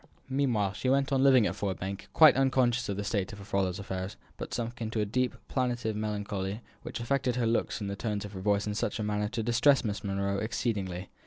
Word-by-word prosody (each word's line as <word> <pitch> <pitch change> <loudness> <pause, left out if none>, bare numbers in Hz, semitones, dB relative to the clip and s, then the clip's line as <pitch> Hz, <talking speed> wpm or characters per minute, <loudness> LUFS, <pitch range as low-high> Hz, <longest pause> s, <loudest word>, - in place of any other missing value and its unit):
Meanwhile 120 -8 +1
she 130 - -1
went 135 +1 +2
on 135 - +3
living 130 -4 +6
at - - -1
Ford 100 -2 -2
Bank, 95 +1 -5
quite 155 -1 +8
unconscious 130 -3 +2
of 100 - -2
the 100 - -2
state 100 -2 -1
of - - -8
her 100 - -10
father's 95 -2 0
affairs, 95 -1 -5 0.2
but - - -7
sunk 120 0 -4
into 110 0 -2
a 105 - +2
deep, 125 +4 0
plaintive 120 -4 -1
melancholy, 105 -1 -3 0.2
which - - -6
affected 125 +1 0
her 125 -2 +1
looks 115 0 0
and 100 - -2
the 100 - -3
tones 105 -1 -3
of 100 - -9
her 95 - -6
voice 100 +1 +2
in 105 - -2
such 110 0 -1
a 110 - -2
manner 105 0 0
as - - -3
to 115 -1 -2
distress 125 +4 +4
Miss 105 -1 -3
Monro 100 0 -1
exceedingly. 100 -5 -2
105 Hz, 235 wpm, -30 LUFS, 100-125 Hz, 0.2 s, quite